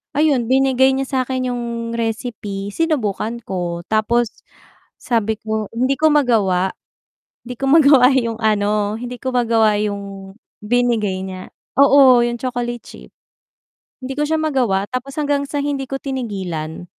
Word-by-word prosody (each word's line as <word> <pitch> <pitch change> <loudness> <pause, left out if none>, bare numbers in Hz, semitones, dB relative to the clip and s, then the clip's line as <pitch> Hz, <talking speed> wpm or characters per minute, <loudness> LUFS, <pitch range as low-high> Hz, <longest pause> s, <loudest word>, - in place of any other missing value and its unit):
ayun, 285 -6 +2
binigay 265 0 +3
niya 270 - -1 0.2
sa'kin 255 0 -2
'yung 245 -1 -3 0.3
recipe 220 -3 -4
sinubukan 235 - -2
ko. 175 -3 -4
Tapos 230 +1 +1 0.6
sabi 220 -3 -1
ko 220 -1 -3
hindi 260 +4 0
ko 315 - +4
magawa, 205 -10 +2 0.7
hindi 250 +1 -7
ko 270 - -2
magawa 280 -4 +6
yung 230 -3 0
ano 210 -1 +1
hindi 245 +1 -7
ko 260 0 -4
magawa 225 -3 +3
'yung 200 -2 -5 0.3
binigay 215 -4 0
niya. 185 -1 -8 0.3
Oo, 275 -3 +7
'yung 240 0 -2
chocolate 240 -1 -3
chip - - -13 0.9
hindi 265 +1 -4
ko - - +2
siya 320 - +1
magawa 250 -11 +1
tapos 255 +2 -5
hanggang 285 -1 0
sa 290 0 -2
hindi 280 -2 -2
ko 270 - -3
tinigilan 190 - -4
240 Hz, 140 wpm, -19 LUFS, 210-265 Hz, 0.9 s, Oo